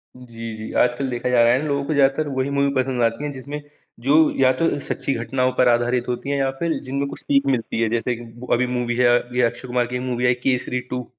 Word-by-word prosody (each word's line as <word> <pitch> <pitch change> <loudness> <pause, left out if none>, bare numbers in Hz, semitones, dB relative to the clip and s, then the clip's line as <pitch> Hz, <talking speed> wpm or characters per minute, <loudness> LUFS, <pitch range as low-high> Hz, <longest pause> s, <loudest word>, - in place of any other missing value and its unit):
जी, 115 -3 -8
जी, 110 0 -7
आजकल 125 +2 +1
देखा 120 0 -2
जा 120 -1 +4
रहा 115 - +5
है 130 - +2
ना - - -3
लोगों 140 -1 0
को 155 - -1
ज़्यादातर 140 +2 +2
वही 130 +1 0
मूवी 140 0 +1
पसंद 130 -1 0
आती 115 +5 0
है 145 - -2
जिसमें 140 +2 -7 0.4
जो 135 +5 +2 0.3
या 130 - +6
तो 165 - +2
उन - - -3
सच्ची - - -2
घटनाओं 130 +2 0
पर 125 - +4
आधारित 120 +1 +1
होती 125 +3 -3
है 140 - 0
या 135 -1 +1
फिर 170 -1 -1
जिनमें 140 +2 -2
कुछ - - -8
सीख 140 0 +2
मिलती 120 -3 -1
है, 115 - +2
जैसे 120 +2 -1
कि 120 - -10
एक 115 0 -14
ब - - -14
अभी 125 +1 +2
मूवी 125 -1 -1
है 125 0 +4
अ, 120 0 +5
अभी 125 +1 -1
अक्षय 120 +2 -1
कुमार 125 0 +1
की 125 0 -3
मूवी 125 -1 -2
आई 125 - +5
केसरी 125 -1 0
टू। 125 -1 -3
125 Hz, 270 wpm, -22 LUFS, 120-135 Hz, 0.4 s, या